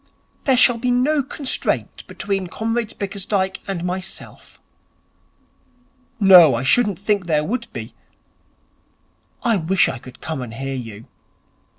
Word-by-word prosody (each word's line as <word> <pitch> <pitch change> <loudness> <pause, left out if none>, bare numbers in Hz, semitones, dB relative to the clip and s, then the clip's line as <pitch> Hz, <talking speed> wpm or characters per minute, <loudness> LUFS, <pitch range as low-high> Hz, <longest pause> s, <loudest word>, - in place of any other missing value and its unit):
There 265 -2 +4
shall 245 -1 +5
be 250 +2 -1
no 270 +5 +2
constraint 270 0 -2
between 195 -3 -3
Comrade 225 +4 -3
Bickersdyke 195 -1 -2
and 190 -3 -3
myself.' 185 +1 -6 1.6
'No, 180 - +8
I 115 - -2
shouldn't 205 - +2
think 200 -2 -1
there 150 -2 +1
would 235 +7 -4
be. - - -7 1.5
I 230 -4 +3
wish 180 +2 +2
I 130 - -4
could 130 +1 -14
come 155 -2 -4
and 115 -2 -7
hear 135 +2 -4
you.' 115 -4 -7
195 Hz, 125 wpm, -20 LUFS, 160-230 Hz, 1.6 s, No